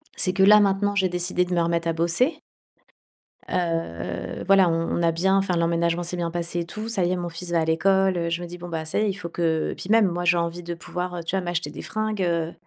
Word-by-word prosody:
C'est 185 - +1
que 190 0 +3
là 210 +2 +8
maintenant, 205 0 +2
j'ai 190 -2 +2
décidé 180 +1 0
de 180 0 -4
me 170 - +2
remettre 170 0 0
à 165 - +1
bosser. 170 - +1 1.1
Heu, 165 - -3
voilà, 195 -1 +5
on 165 +1 -1
on - - 0
a 170 -1 +3
bien 190 +4 +2
enfin 195 -2 +1
l'emménagement 170 0 +1
s'est 175 +1 -3
bien 170 -1 -1
passé 175 0 -3
et 170 - -2
tout. 215 +6 -6
Ça 210 -5 0
y 175 - 0
est - - +1
mon 175 -1 -4
fils 170 +1 -7
va 170 - +2
à - - 0
l'école, 190 +3 +2
heu, 170 -1 -1
je 170 +1 -2
me 175 - -5
dis 175 +1 -9
«Bon, 175 0 -8
bah 160 -1 -4
ça 155 - -1
y - - +2
est, 215 - +1
il - - -1
faut 180 -3 -7
que» 165 -2 0
et - - -6
puis 180 - -9
même, 220 -1 +5
moi, 175 0 -2
j'ai 175 0 +4
envie 170 +1 -2
de 170 0 -4
pouvoir, 180 +1 -5
heu, 170 - -5
tu 165 - -2
vois 190 - -1
m'acheter 175 -3 -2
des 150 - -8
fringues, 215 -2 -3
heu, 170 -2 0
175 Hz, 280 wpm, -24 LUFS, 170-190 Hz, 1.1 s, là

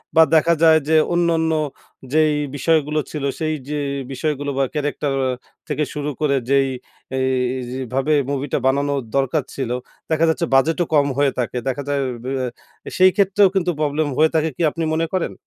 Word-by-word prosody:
বা 160 - +8
দেখা 165 +2 +4
যায় 160 -1 +7
যে 160 - +4 0.2
অন্যান্য 165 -2 +2 0.6
যেই 155 -1 +4 0.2
বিষয়গুলো 155 +1 +1
ছিল 150 -3 -5 0.2
সেই 155 -1 0 0.2
যে 150 0 -2 0.3
বিষয়গুলো 145 +1 -2
বা - - +3
ক্যারেক্টার 145 -1 -2
আ - - 0 0.4
থেকে 150 - -1
শুরু 150 0 -3
করে 145 -2 +2
যেই, 140 -1 +3 0.5
এইজ 130 -1 -1 0.2
ভাবে 135 +3 +1 0.2
মুভিটা 140 +1 -1
বানানোর 140 +1 +1 0.2
দরকার 135 +1 +1
ছিল, 130 -4 -3 0.4
দেখা 160 +1 +3
যাচ্ছে 160 +1 0
বাজেটও 165 +6 +3
কম 145 -1 +4
হয়ে 140 -1 +3
থাকে। 125 0 -2
দেখা 135 +2 -2
যায় 140 -1 0 0.2
বেয়া 130 0 -2 0.4
এ - - -3
সেই 185 0 +6
ক্ষেত্রেও 200 -1 +4
কিন্তু 180 -2 +2
প্রবলেম 150 +1 0
হয়ে 160 +1 +4
থাকে 160 0 +2
কি - - -6
আপনি 165 - -4
মনে 165 +1 +1
করেন? 185 -2 -1
150 Hz, 170 wpm, -20 LUFS, 140-160 Hz, 0.6 s, বা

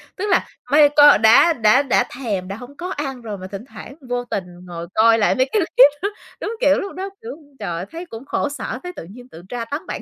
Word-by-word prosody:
tức 385 - -4
là 370 - +2 0.2
mây 295 0 +6
co 290 0 +8
đã 225 +10 +6
đã 230 0 +3
đã 270 - +2
thèm, 205 -8 -3
đã 195 - -5
hông 245 +6 -12
có 360 +1 -5
ăn 270 -6 -5
rồi 215 -3 -6
mà 185 0 -8
thỉnh 195 +4 -8
thoảng 275 - -12
vô 245 0 -2
tình 200 -5 -3 0.2
ngồi 170 -1 -7
coi 225 +1 +5
lại 215 +5 +2
mấy 260 - +2
cái 430 - +2
clip 290 -6 +5
đó, 400 - 0 0.3
đúng 455 - -4
kiểu 285 0 +4
lúc 395 - -6
đó, 380 +2 -5
kiểu, 450 -9 -8 0.2
trời 205 - -4
ơi 175 - -5
thấy 335 +2 -7
cũng 230 -6 -10
khổ 285 - -2
sở, 285 -3 -5
thấy 360 0 -7
tự - - -8
nhiên 245 +5 -13
tự 165 - -12
tra 240 -2 -4
tấn 285 +7 -5
bản - - -5
250 Hz, 260 wpm, -20 LUFS, 220-295 Hz, 0.3 s, co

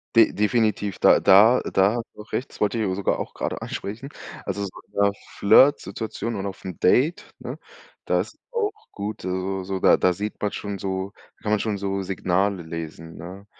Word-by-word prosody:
De 115 -1 +7
definitiv. 105 -2 +1
Da - - +6
da 105 +6 +6
da 100 +4 +2
hast 120 - -2
du - - -9
auch 110 - -15
recht, 130 - -2
das - - -15
wollte 105 +2 +1
ich 95 -3 0
sogar 100 - 0
auch - - -5
gerade - - -3
ansprechen. 115 +8 -5 0.4
Also, 100 +1 -2
so 100 - -3 0.2
in - - -36
'ner 100 0 +3 0.3
Flirtsituation 110 -1 +3
und 100 0 -3
auf 95 -2 -6
'n 90 -3 -6
Date, 140 - +3
ne, - - -6 0.5
da - - +2
ist - - -9
auch 445 -4 0 0.2
gut, 105 0 -5
also, 95 +1 -2
so, 95 0 -3
da - - +5
da 90 -1 +3
sieht 105 +4 -5
man 105 - 0
schon 100 -2 -5
so 95 0 -3 0.3
kann 105 - -2
man 105 - +3
schon 105 -2 -1
so 100 0 -2
Signale 95 0 0
lesen, 80 0 -7
ne? 95 +4 -9
100 Hz, 200 wpm, -24 LUFS, 95-110 Hz, 0.5 s, De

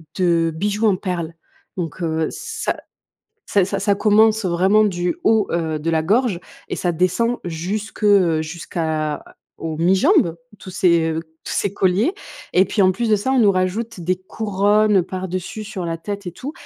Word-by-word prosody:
de 170 -3 +2
bijoux 205 +5 -1
en 195 -4 +3
perles. 175 -4 -3 0.4
Donc, 170 0 -4
heu, 160 -1 0
ça 450 +1 -4 0.7
ça 200 -2 +3
ça 195 +1 -3
ça 200 0 +2
commence, 215 0 +4
heu, - - +1
vraiment 190 +5 +4
du 180 - -1
haut, 220 -2 +3
heu, 160 -2 -1
de 165 +2 -1
la 160 -1 +1
gorge 215 +1 +2 0.3
et - - -3
ça 175 - 0
descend 185 +8 +1
jusque, 190 +7 -4
heu, 180 -6 +4
jusqu'à 160 -2 -3 0.3
aux 160 -1 -4
mi-jambes, 190 - +3 0.2
tous 185 - -9
ces 170 -3 +2 0.3
tous - - -5
ces 200 - 0
colliers 195 - +2 0.4
et 185 - +5
puis, 215 - -1
en 185 - +5
plus 230 +4 -2
de 215 - +4
ça, 260 +7 -1
on 265 - +3
nous 210 -3 +5
rajoute 185 +3 -2
des 180 +2 0
couronnes, 205 +1 +1
heu, - - +3
par-dessus, 185 +3 -5
sur 200 -4 -5
la 165 0 -2
tête 200 +2 -6
et - - -3
tout 275 +10 -7
185 Hz, 180 wpm, -20 LUFS, 170-210 Hz, 0.7 s, et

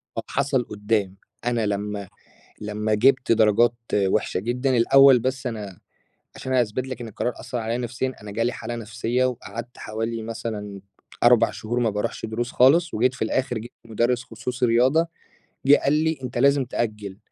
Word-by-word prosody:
طب - - -3
حصل 135 -2 0
قُدّام 105 -3 -2 0.3
أنا 120 -2 0
لمّا 105 -1 -3 0.5
لمّا 105 +1 -2
جِبت 130 +4 +3
درجات 110 +1 +4 0.2
وحشة 100 -1 +1
جدًا، 125 +4 0
الأول 135 +2 +7
بس 130 +2 -2
أنا 105 -6 -6 0.6
عشان 130 - -5
هاثبت 125 0 0
لك 130 -1 -6
إن 120 - -6
القرار 115 +3 -2
أثَّر 125 - -5
عليه 115 +1 -2
نفسيًا، 125 +2 -3
أنا 105 - -8
جالي 115 +3 0
حالة 120 - -6
نفسية 115 +3 -1
وقعدت 120 -1 -5
حوالي 115 +1 -4
مثلًا 110 -3 -5 0.4
4 120 -1 +5
شهور 120 +3 -3
ما 115 -2 +2
باروحش 105 +1 -3
دروس 120 +2 -3
خالص، 160 +7 +4
وجيت 125 +4 +2
في 130 - -5
الآخر 125 +2 -1
جِبت 115 +2 -9
مدرس 120 +2 0
خصوصي 125 +3 -3
رياضة، 130 +8 +3 0.6
جِه 145 +1 +8
قال 140 - +3
لي: 160 0 +1
"أنت 125 -1 -4
لازم 140 +1 +4
تأجل،" 105 -5 -4
120 Hz, 165 wpm, -24 LUFS, 110-130 Hz, 0.6 s, جِه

